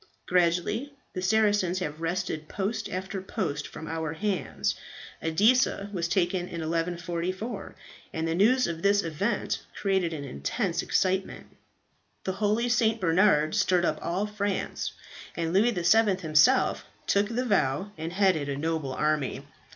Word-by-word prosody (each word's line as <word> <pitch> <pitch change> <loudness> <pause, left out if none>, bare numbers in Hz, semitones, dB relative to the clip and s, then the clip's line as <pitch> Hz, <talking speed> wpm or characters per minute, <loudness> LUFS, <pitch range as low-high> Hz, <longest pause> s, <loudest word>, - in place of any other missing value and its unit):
"Gradually 180 +10 +1 0.2
the 185 - -3
Saracens 205 -2 +2
have 155 -4 -4
wrested 165 -2 -2
post 205 +3 -2
after 190 +1 -4
post 165 -7 -3
from 160 - -9
our 160 -1 -3
hands. 200 +2 -1 0.5
Edessa 205 +4 +2
was 170 -3 -1
taken 175 0 0
in 170 -2 -5
1144, 175 +5 -3 0.4
and 160 0 -2
the 165 - 0
news 240 +8 +4
of 165 -1 -4
this 200 +1 +3
event 195 +7 -1 0.2
created 190 -4 +1
an 150 -3 -5
intense 170 - -2
excitement. 190 0 -1 0.7
The 190 - -1
holy 215 +3 +2
St. 230 -2 +2
Bernard 165 -3 +3
stirred 185 -4 +3
up 155 - 0
all 180 +5 -1
France, 205 -2 -2 0.4
and 165 0 -2
Louis 210 +5 +4
VII. 205 +1 +3
himself 165 +11 +3 0.2
took 200 +1 +2
the 245 +2 -1
vow 190 - +1
and 160 0 -5
headed 180 -6 +2
a 140 - -2
noble 155 -3 -2
army. 150 -2 0
185 Hz, 140 wpm, -27 LUFS, 165-205 Hz, 0.7 s, news